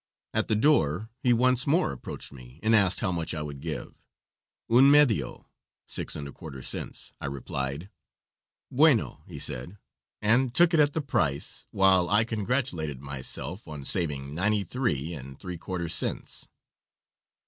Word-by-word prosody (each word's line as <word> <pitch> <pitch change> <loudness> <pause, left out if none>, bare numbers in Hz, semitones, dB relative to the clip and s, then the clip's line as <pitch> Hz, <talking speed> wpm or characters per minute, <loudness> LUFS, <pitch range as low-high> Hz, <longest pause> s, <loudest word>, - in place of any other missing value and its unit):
At 110 0 +1
the 110 - +2
door 110 - +2
he 125 - +3
once 125 +2 +3
more 155 - +2
approached 65 - -7
me 65 +2 -14
and 110 +1 +4
asked 100 -3 +3
how 95 - 0
much 85 -2 -3
I 75 - -3
would 70 -2 -7
give. 80 -1 -6 0.7
"Un 125 +4 +6
medio" 145 -6 +3 0.4
(six - - 0
and 70 -2 -5
a - - -8
quarter 70 -5 -10
cents), - - -4
I - - -3
replied. 70 +5 -4 0.8
"Bueno," 125 - +3
he - - -9
said, 65 +11 0 0.4
and 120 +4 +2
took 175 0 +5
it 165 - +4
at 145 -1 +4
the 160 - -1
price, 75 - 0
while 95 -3 +4
I 105 +3 +4
congratulated 105 - -2
myself 70 - -4
on 75 -3 -8
saving 70 -6 +1
ninety 100 +5 +1
three 85 - -2
and 70 -3 -9
three 90 -3 -7
quarter 85 -1 -4
cents. - - -2
90 Hz, 155 wpm, -27 LUFS, 70-115 Hz, 0.8 s, Un